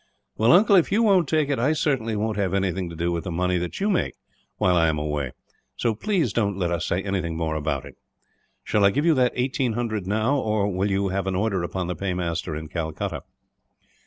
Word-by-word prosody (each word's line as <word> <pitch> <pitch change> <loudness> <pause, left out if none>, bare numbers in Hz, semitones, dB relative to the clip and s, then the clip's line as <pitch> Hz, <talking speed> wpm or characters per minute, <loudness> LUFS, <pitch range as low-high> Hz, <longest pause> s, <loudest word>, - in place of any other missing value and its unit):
"Well, 115 +2 +3
uncle, 200 +3 +6
if 175 - +2
you 220 +4 +3
won't 190 - +4
take 155 -2 +2
it, 140 - 0
I 135 +6 +2
certainly 130 -8 0
won't 110 +1 -1
have 100 -2 0
anything 95 -2 -1
to 85 - -8
do 85 +1 -1
with 85 -1 -2
the 95 - -5
money 90 +1 0
that 90 0 -4
you 200 - 0
make, 200 -4 0 0.4
while 90 -1 +3
I 85 -1 +4
am 80 -1 0
away; 75 -3 -2 0.4
so 115 - 0
please 165 - 0
don't 100 -4 0
let 90 -3 -1
us 85 -1 -1
say 90 +2 -1
anything 90 -5 -2
more 80 -1 -1
about 75 0 -2
it. - - -13 0.7
Shall 105 - +1
I 100 - +7
give 145 +10 0
you 170 - +5
that 125 -3 +3
eighteen 125 -1 0
hundred 110 -5 -2
now; 110 +7 +1
or 105 -4 0
will 95 +3 0
you 100 0 0
have 95 0 -2
an 95 - -1
order 100 -1 0
upon 90 +1 -3
the 90 +1 -3
paymaster, 90 -4 -2
in 80 +1 -6
Calcutta?" 80 -1 -4
100 Hz, 225 wpm, -24 LUFS, 85-125 Hz, 0.7 s, I